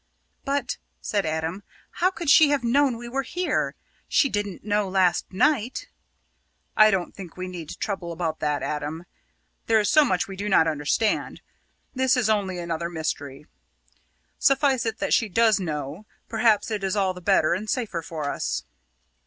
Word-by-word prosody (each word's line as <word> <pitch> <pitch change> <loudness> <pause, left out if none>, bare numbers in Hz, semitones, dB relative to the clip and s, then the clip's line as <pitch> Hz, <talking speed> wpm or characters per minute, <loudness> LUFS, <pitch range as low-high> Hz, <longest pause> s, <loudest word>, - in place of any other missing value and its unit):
"But," 275 -2 -1 0.2
said 200 -5 -1
Adam, 160 +4 -2 0.4
"how 365 - +5
could 345 -3 -7
she 285 +1 +7
have 285 -3 +1
known 260 +1 +2
we 240 +1 -8
were 265 +3 -1
here? 355 +6 -1 0.3
She 275 - +3
didn't 205 -4 -3
know 205 -2 0
last 185 -2 +2
night." 250 +3 +1 0.9
"I 215 0 +7
don't 190 -4 -1
think 185 -4 -10
we 185 0 -4
need 175 -4 -7
trouble 190 -4 -3
about 165 -2 -3
that, 150 -1 -1
Adam. 150 +3 -4 0.6
There 225 -1 +4
is 210 - +1
so 305 0 +6
much 185 -10 0
we 195 - -7
do 205 +2 -3
not 165 -4 +4
understand. 155 +8 0 0.5
This 260 0 +2
is 220 -3 +2
only 195 -4 0
another 170 -1 -3
mystery. 150 -4 -4 0.9
Suffice 270 -3 +3
it 225 0 -2
that - - -1
she 225 - +2
does 220 +1 +3
know 155 +2 -5 0.2
perhaps 225 -1 +2
it 210 -2 -2
is 195 +1 0
all 190 -2 +1
the 180 - -11
better 180 -4 +3
and 210 +4 -4
safer 220 -9 -2
for 155 -3 -5
us." - - -2
200 Hz, 170 wpm, -25 LUFS, 170-235 Hz, 0.9 s, she